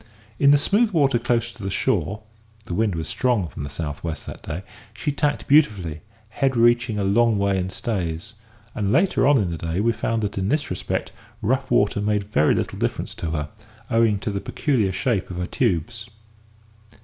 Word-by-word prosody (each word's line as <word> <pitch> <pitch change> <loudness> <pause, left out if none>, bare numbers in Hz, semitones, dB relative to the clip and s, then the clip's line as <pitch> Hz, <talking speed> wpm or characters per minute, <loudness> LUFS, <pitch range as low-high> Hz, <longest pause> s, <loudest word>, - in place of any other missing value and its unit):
In 140 - +5
the 145 - +7
smooth 205 +10 +2
water 140 - +2
close 120 0 0
to - - -14
the 95 - -3
shore 100 +2 -1 0.4
(the 90 - -5
wind 105 0 +1
was 80 -2 -3
strong 120 -6 +1
from 70 - -8
the 70 - -4
south 75 0 -5
west, 80 -2 -4
that - - -8
day) 85 +6 -5 0.3
she 145 - -1
tacked 145 0 -1
beautifully, 100 - +3 0.3
head 130 +2 0
reaching 120 -1 +3
a 100 - 0
long 115 +3 +3
way 100 -1 +1
in 90 0 -2
stays; 95 -1 -3 0.4
and 100 -2 -1
later 175 - +3
on 145 -1 +6
in 95 -7 0
the 85 - -5
day 85 +2 -2
we 115 +3 +3
found 115 0 -1
that 100 -1 -2
in 95 +1 -1
this 150 -4 0
respect 90 - -3 0.3
rough 130 +4 0
water 100 0 +2
made 105 0 +1
very 75 -7 +2
little - - -3
difference - - -2
to 85 - -4
her, 75 -2 -3 0.4
owing 115 -3 +3
to 105 - -3
the 100 0 -3
peculiar 120 -10 0
shape 115 0 -1
of 90 - -6
her 90 - -1
tubes. 110 +8 -1
105 Hz, 195 wpm, -23 LUFS, 90-120 Hz, 0.4 s, the